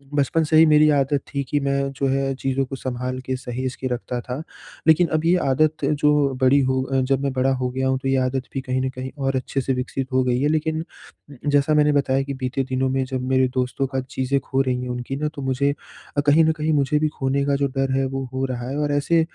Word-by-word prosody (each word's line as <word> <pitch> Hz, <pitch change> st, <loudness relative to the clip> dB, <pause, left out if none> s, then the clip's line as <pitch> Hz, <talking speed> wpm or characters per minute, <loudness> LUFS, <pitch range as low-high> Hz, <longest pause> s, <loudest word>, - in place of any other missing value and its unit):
बचपन 145 Hz, +3 st, +2 dB
से 155 Hz, 0 st, +2 dB
ही 160 Hz, -, +8 dB
मेरी 155 Hz, 0 st, +5 dB
आदत 140 Hz, +1 st, 0 dB
थी 140 Hz, -1 st, -1 dB
कि 145 Hz, -, +1 dB
मैं 140 Hz, 0 st, 0 dB
जो 135 Hz, 0 st, -1 dB
है 135 Hz, 0 st, 0 dB
चीज़ों 135 Hz, 0 st, -1 dB
को 135 Hz, -, -6 dB
संभाल 130 Hz, 0 st, -4 dB
के 130 Hz, -, -1 dB
सहेज 130 Hz, 0 st, -4 dB
के 130 Hz, -, -4 dB
रखता 125 Hz, 0 st, -4 dB
था। 125 Hz, +4 st, -5 dB, 0.5 s
लेकिन 160 Hz, +2 st, +5 dB
अब 155 Hz, -, -3 dB
ये 175 Hz, +2 st, +4 dB
आदत 155 Hz, +4 st, +1 dB
जो 150 Hz, 0 st, +2 dB, 0.3 s
बड़ी 130 Hz, +2 st, +5 dB
हो 130 Hz, 0 st, +1 dB
अ, 135 Hz, 0 st, 0 dB
जब 135 Hz, +1 st, 0 dB
मैं 140 Hz, -, 0 dB
बड़ा 130 Hz, +1 st, +2 dB
हो 125 Hz, -1 st, -2 dB
गया 130 Hz, +1 st, -1 dB
हूँ 130 Hz, 0 st, +1 dB
तो 135 Hz, -, -4 dB
ये 135 Hz, -, +2 dB
आदत 130 Hz, 0 st, -1 dB
भी 135 Hz, -, -2 dB
कहीं 130 Hz, -1 st, -2 dB
न 130 Hz, -, -1 dB
कहीं 130 Hz, 0 st, -6 dB
और 135 Hz, -1 st, -1 dB
अच्छे 130 Hz, +1 st, -2 dB
से 135 Hz, -, -1 dB
विकसित 130 Hz, +1 st, -3 dB
हो 130 Hz, 0 st, +3 dB
गई 125 Hz, -1 st, +1 dB
है। 145 Hz, -, +2 dB
लेकिन 155 Hz, +1 st, 0 dB, 0.6 s
जैसा 145 Hz, +1 st, +3 dB
मैंने 150 Hz, 0 st, +4 dB
बताया 135 Hz, -1 st, +1 dB
कि 140 Hz, 0 st, -5 dB
बीते 130 Hz, 0 st, -2 dB
दिनों 130 Hz, 0 st, -1 dB
में 135 Hz, 0 st, 0 dB
जब 130 Hz, -1 st, -3 dB
मेरे 130 Hz, 0 st, +3 dB
दोस्तों 130 Hz, +2 st, -1 dB
का 135 Hz, 0 st, -2 dB
चीज़ें 130 Hz, +1 st, 0 dB
खो 135 Hz, 0 st, -1 dB
रही 130 Hz, -2 st, -1 dB
हैं 125 Hz, -, -5 dB
उनकी 125 Hz, +2 st, -4 dB
ना 150 Hz, +2 st, -1 dB
तो 140 Hz, -, -6 dB
मुझे 135 Hz, +1 st, +1 dB, 0.5 s
अ, -, -, +4 dB
कहीं 150 Hz, +3 st, +4 dB
न 160 Hz, -, +4 dB
कहीं 155 Hz, 0 st, -1 dB
मुझे 145 Hz, +1 st, +2 dB
भी 155 Hz, -, +2 dB
खोने 135 Hz, +1 st, 0 dB
का 140 Hz, 0 st, +1 dB
जो 140 Hz, 0 st, +1 dB
डर 135 Hz, 0 st, +1 dB
है 135 Hz, -, +1 dB
वो 135 Hz, 0 st, -3 dB
हो 130 Hz, +1 st, -1 dB
रहा 125 Hz, -1 st, -4 dB
है। 140 Hz, -, -3 dB
और 145 Hz, -, 0 dB
ऐसे 145 Hz, +4 st, +2 dB
135 Hz, 255 wpm, -22 LUFS, 130-145 Hz, 0.6 s, ही